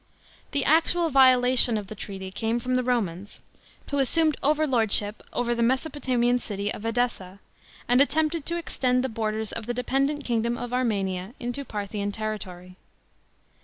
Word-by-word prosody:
The 280 -2 +1
actual 330 +2 +3
violation 255 -3 +5
of 210 - -4
the 205 - -8
treaty 195 -2 -7
came 225 +3 -1
from 250 +2 -3
the 255 - +2
Romans, 205 -6 -2 0.5
who 285 - 0
assumed 310 +3 +3
overlordship 240 -8 +2
over 240 -1 0
the 235 - -2
Mesopotamian 250 -1 +1
city 205 -2 -4
of - - -8
Edessa, 225 -5 -2 0.5
and 245 +2 +4
attempted 310 +2 +1
to 340 - -1
extend 255 -6 0
the 260 - -1
borders 220 -1 -3
of 225 -1 -4
the 240 - -2
d< 250 - -2
pendent 275 +3 0
king 235 -3 0
dom 235 +1 -1
of 245 0 -6
Armenia 200 -4 -1
into 245 +3 -4
Parthian 205 -3 -4
territory. 185 -4 -6
240 Hz, 160 wpm, -25 LUFS, 210-265 Hz, 0.5 s, violation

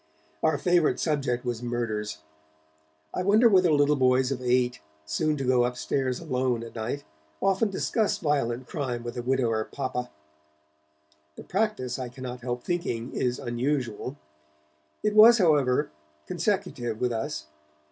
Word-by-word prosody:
Our 155 -2 +2
favourite 175 0 +2
subject 135 -6 -1
was 120 -2 -2
murders. 110 -8 -3 0.9
I - - -1
wonder 210 +5 +5
whether 185 -5 +5
little 145 0 +4
boys 130 0 +3
of 130 -2 -3
eight, 125 0 +1 0.3
soon 150 - 0
to 135 - -3
go 125 -1 +3
upstairs 125 +1 -1
alone 130 -6 -1
at 115 - -9
night, 120 +5 -4 0.4
often 195 +3 +2
discuss 210 +2 0
violent 130 -6 -1
crime 125 -6 -3
with 120 - -6
a 120 - -3
widower 120 -3 +1
papa? 130 -1 -4 1.3
The - - -10
practice, 195 - -1
I 125 -1 -4
cannot 125 0 -7
help 120 0 -4
thinking, 130 -9 -2
is 125 0 0
unusual; 125 0 -2 0.9
it 210 - +1
was, 225 +3 +9
however, 145 - +3 0.3
consecutive 115 +5 -2
with 125 -1 +1
us. 110 -9 -3
130 Hz, 135 wpm, -27 LUFS, 120-150 Hz, 1.3 s, was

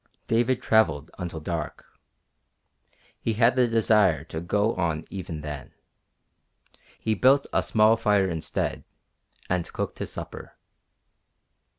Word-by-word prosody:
David 120 +2 +1
travelled 80 -11 +2
until 85 -3 -4
dark. 80 -1 -5 1.3
He 115 - -1
had 115 +3 +3
the 125 -1 +4
desire 105 -9 +3
to 80 - -3
go 105 +6 +1
on 80 -3 -1
even 90 -5 -6
then. 75 -3 -7 1.2
He 110 - -1
built 135 +6 +4
a - - +3
small 110 +1 +4
fire 105 -3 +2
instead, 80 -3 -3 0.6
and 90 -2 -1
cooked - - -4
his - - -4
supper. - - -8
100 Hz, 115 wpm, -26 LUFS, 80-115 Hz, 1.3 s, the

